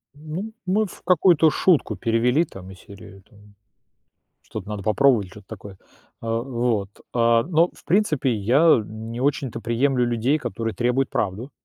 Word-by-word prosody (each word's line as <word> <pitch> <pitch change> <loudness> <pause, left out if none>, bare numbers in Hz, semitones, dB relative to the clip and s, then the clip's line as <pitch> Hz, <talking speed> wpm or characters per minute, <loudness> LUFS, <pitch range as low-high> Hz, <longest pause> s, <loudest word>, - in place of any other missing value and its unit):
Ну, 160 +9 -7
мы 210 +4 +1
в 185 - -12
какую-то 175 -2 +4
шутку 150 - +2
перевели, 115 - +1
там, 95 0 -12
из 95 - -14
серии, 100 -1 -14
там, 105 -2 -20 0.9
"что-то 95 - -8
надо 105 -2 -5
попробовать", 110 -2 +3
или 90 - -16
чё-то 105 -2 -14
такое. 100 -3 -10 0.4
А, 115 0 -2
вот, 120 -6 -1 0.2
а, 115 -1 +3
но, 170 0 +2
в - - -19
принципе, 155 - +1
я 120 +6 +4
не 110 +2 -8
очень-то 135 -4 -1
приемлю 125 +3 +1
людей, 120 +5 +1
которые 115 -3 -4
требуют 125 +5 0
правду. 110 +7 -3
120 Hz, 155 wpm, -23 LUFS, 105-145 Hz, 0.9 s, какую-то